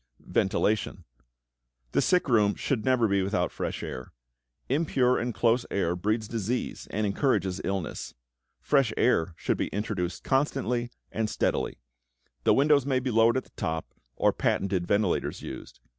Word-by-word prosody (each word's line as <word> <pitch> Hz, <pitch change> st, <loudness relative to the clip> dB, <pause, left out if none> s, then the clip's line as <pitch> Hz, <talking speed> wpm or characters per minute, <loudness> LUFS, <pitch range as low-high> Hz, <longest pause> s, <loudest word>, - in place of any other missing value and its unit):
=Ventilation.= 105 Hz, +2 st, 0 dB, 0.9 s
The -, -, +2 dB
sick 180 Hz, -3 st, +2 dB
room 105 Hz, -5 st, +3 dB
should 125 Hz, -6 st, -1 dB
never 130 Hz, -3 st, +3 dB
be 100 Hz, -1 st, +2 dB
without 95 Hz, -2 st, 0 dB
fresh -, -, -4 dB
air. 65 Hz, -, -6 dB, 0.6 s
Impure 130 Hz, -3 st, +2 dB
and 120 Hz, +1 st, -1 dB
close 120 Hz, +1 st, +2 dB
air 90 Hz, -3 st, 0 dB
breeds 105 Hz, +4 st, -1 dB
disease 115 Hz, +2 st, -3 dB
and 105 Hz, 0 st, -1 dB
encourages 100 Hz, -3 st, 0 dB
illness. 95 Hz, -4 st, -3 dB, 0.5 s
Fresh 135 Hz, -6 st, +3 dB
air 85 Hz, -8 st, +2 dB
should -, -, -1 dB
be -, -, -1 dB
introduced 100 Hz, -4 st, -3 dB
constantly 130 Hz, -3 st, 0 dB, 0.2 s
and 110 Hz, -1 st, -1 dB
steadily. -, -, -1 dB, 0.7 s
The -, -, +5 dB
windows 140 Hz, -1 st, +4 dB
may 130 Hz, -2 st, +2 dB
be 130 Hz, 0 st, -2 dB
lowered 115 Hz, +2 st, +4 dB
at 130 Hz, -, -1 dB
the -, -, -24 dB
top 80 Hz, 0 st, -4 dB, 0.2 s
or -, -, +3 dB
patented 95 Hz, -3 st, 0 dB
ventilators 100 Hz, -2 st, 0 dB
used. -, -, -8 dB
110 Hz, 145 wpm, -28 LUFS, 100-125 Hz, 0.9 s, The